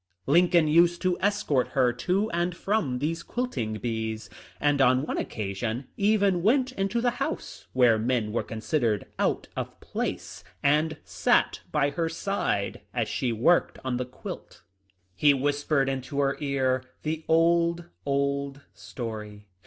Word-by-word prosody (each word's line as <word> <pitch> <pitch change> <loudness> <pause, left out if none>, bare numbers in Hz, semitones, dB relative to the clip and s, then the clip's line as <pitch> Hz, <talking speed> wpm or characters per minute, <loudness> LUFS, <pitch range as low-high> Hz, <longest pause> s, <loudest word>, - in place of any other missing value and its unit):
Lincoln 170 +2 +4
used 170 +2 +4
to 185 -1 +2
escort 185 -10 +1
her 125 -2 +4
to 185 - 0
and 175 +1 -1
from 195 -12 0
these 160 +5 -2
quilting 170 - -3
bees, 110 -2 -4 0.3
and 145 -1 +2
on 130 +1 +4
one - - -2
occasion 110 +4 -3
even 200 -3 +2
went 255 +6 +3
into 215 +1 -1
the 245 0 +2
house - - -4
— - - -40
where 120 -4 +5
men 115 -2 0
were 115 - 0
considered 110 -1 -1
out - - 0
of - - -5
place - - -4
— 90 - -38
and 155 +2 +2
sat 85 -3 +1
by 140 +1 +2
her 165 +1 -1
side 165 - -2
as 115 -3 0
she 125 -3 -1
worked 125 +10 +2
on 125 -1 0
the 125 - -2
quilt. 125 +1 -9 0.6
"^He 145 -2 +5
whispered 145 0 +1
into 135 +1 -3
her 140 -1 +2
ear 130 -3 0 0.2
the 155 +1 -2
old, 170 +1 +3 0.2
old 140 0 -1
story. 105 -3 -7
140 Hz, 150 wpm, -27 LUFS, 120-170 Hz, 0.6 s, where